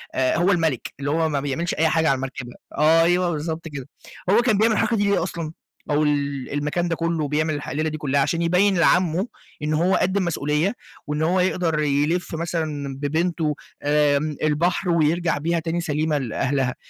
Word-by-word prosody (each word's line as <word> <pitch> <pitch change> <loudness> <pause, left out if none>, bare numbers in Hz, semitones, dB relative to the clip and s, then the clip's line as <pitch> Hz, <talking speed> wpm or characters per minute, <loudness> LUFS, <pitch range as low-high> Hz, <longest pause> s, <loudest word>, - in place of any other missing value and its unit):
آآ 130 +2 +2
هو 175 +4 +3
الملك، 160 - 0
اللي 145 +1 -2
هو 160 0 +1
ما 145 - 0
بيعملش 145 +5 -2
أي 160 - +2
حاجة 160 0 +2
على 135 - +3
المركبة 130 -2 -6 0.2
أيوه 165 +3 +4
بالضبط 160 +1 -4
كده. 145 -4 -7 0.4
هو 220 +5 +5
كان 225 -5 +2
بيعمل 220 +1 +3
الحركة 225 +1 +1
دي 205 - +1
ليه 200 - +2
أصلًا؟ 170 -3 -4 0.4
أو 150 +1 +2
ال 140 -3 -1
المكان 150 +4 -1
ده 165 - -1
كُلّه 165 -3 -1
بيعمل 155 +2 0
الح 145 -1 -5
الليلة 155 +4 -1
دي 155 - -5
كُلّها، 140 -1 +1
عشان 165 +4 0
يبيّن 180 +3 +3
لعمه 175 +4 +3 0.4
إن 155 +1 0
هو 175 +5 +2
قد 190 +2 +1
المسؤولية، 165 0 0 0.3
وإن 150 +1 -2
هو 175 +4 +2
يقدر 180 -3 +1
يِلِف 150 +4 0
مثلًا 155 -4 -3
ببنته 160 +1 0 0.3
آمم 150 0 +2
البحر 170 +5 +1
ويرجع 170 0 +2
بيها 165 +3 0
تاني 165 +1 -2
سليمة 155 -1 0
لأهلها، 130 0 -1
160 Hz, 180 wpm, -23 LUFS, 145-175 Hz, 0.4 s, هو